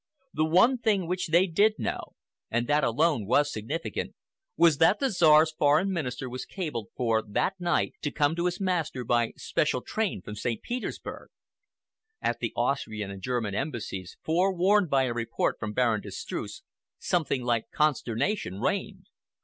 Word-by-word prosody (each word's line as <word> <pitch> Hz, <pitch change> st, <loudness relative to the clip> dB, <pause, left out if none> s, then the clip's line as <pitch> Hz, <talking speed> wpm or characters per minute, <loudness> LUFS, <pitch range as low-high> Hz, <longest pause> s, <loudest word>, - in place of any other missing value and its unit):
The 155 Hz, -, +1 dB
one 185 Hz, +11 st, +4 dB
thing 210 Hz, -5 st, +1 dB
which 180 Hz, +2 st, -2 dB
they 170 Hz, +3 st, +4 dB
did 205 Hz, +5 st, +2 dB
know, -, -, -4 dB, 0.3 s
and 120 Hz, +1 st, 0 dB
that 145 Hz, +2 st, +2 dB
alone 135 Hz, -3 st, +1 dB
was 145 Hz, +5 st, +3 dB
significant 140 Hz, +10 st, -3 dB
enough, -, -, -26 dB, 0.4 s
was 165 Hz, -3 st, +5 dB
that 185 Hz, +5 st, +5 dB
the 270 Hz, -2 st, +1 dB
Czar's 160 Hz, -3 st, +5 dB
Foreign 155 Hz, +5 st, +2 dB
Minister 130 Hz, -7 st, -3 dB
was 125 Hz, +1 st, -5 dB
cabled 150 Hz, -, -5 dB
for 115 Hz, -3 st, +2 dB
that 180 Hz, -, -1 dB
night 175 Hz, -2 st, 0 dB
to 150 Hz, -, -1 dB
come 145 Hz, +1 st, +1 dB
to 170 Hz, +1 st, 0 dB
his 175 Hz, 0 st, -3 dB
master 175 Hz, -9 st, -1 dB
by 120 Hz, 0 st, +1 dB
special 140 Hz, -4 st, 0 dB
train 205 Hz, -, -2 dB
from 105 Hz, -, -7 dB
St. 110 Hz, +2 st, -3 dB
Petersburg. 245 Hz, -1 st, -5 dB, 0.9 s
At -, -, -1 dB
the -, -, -2 dB
Austrian 110 Hz, -7 st, -1 dB
and 95 Hz, -1 st, -9 dB
German 115 Hz, -2 st, -2 dB
Embassies, 105 Hz, -, -4 dB
forewarned 185 Hz, +3 st, +2 dB
by 135 Hz, -1 st, +3 dB
a 125 Hz, -2 st, -1 dB
report 115 Hz, -1 st, -1 dB
from 105 Hz, -2 st, -3 dB
Baron 115 Hz, -2 st, +1 dB
de -, -, -9 dB
Streuss, -, -, -6 dB, 0.3 s
something 145 Hz, -7 st, 0 dB
like 120 Hz, -2 st, 0 dB
consternation 140 Hz, -, 0 dB
reigned. 190 Hz, -, -2 dB
150 Hz, 165 wpm, -27 LUFS, 120-180 Hz, 0.9 s, was